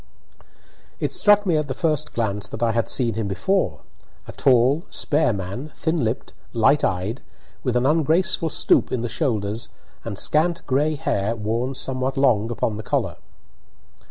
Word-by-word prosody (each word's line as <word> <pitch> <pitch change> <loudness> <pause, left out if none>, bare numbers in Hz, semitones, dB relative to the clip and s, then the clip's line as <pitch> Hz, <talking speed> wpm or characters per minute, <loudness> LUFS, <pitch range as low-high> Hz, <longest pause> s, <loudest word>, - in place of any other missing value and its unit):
It - - -2
struck 205 0 +4
me 170 -4 +2
at 150 -1 -1
the 130 - -4
first 155 -2 0
glance 105 -3 -2
that 110 - -4
I 115 - +3
had 115 0 0
seen 120 -3 +1
him 110 -1 -2
before 100 - 0 0.5
a - - -6
tall, 130 +3 +3
spare 150 -2 +1
man, 100 +9 -5
thin 160 -3 -1
lipped, 115 +2 -3 0.2
light 125 +5 +3
eyed, 95 +7 -1 0.4
with 125 -3 -1
an 125 +1 +2
ungraceful 165 +3 +2
stoop - - +2
in 125 - -1
the 120 - -3
shoulders 110 -6 -2 0.3
and 110 -4 -5
scant 165 - +1
gray 145 +4 +1
hair 105 -5 -1
worn 115 +5 -2
somewhat 130 +1 -2
long 120 -5 +3
upon 110 -2 -2
collar. 110 - -1
125 Hz, 155 wpm, -23 LUFS, 110-150 Hz, 0.5 s, struck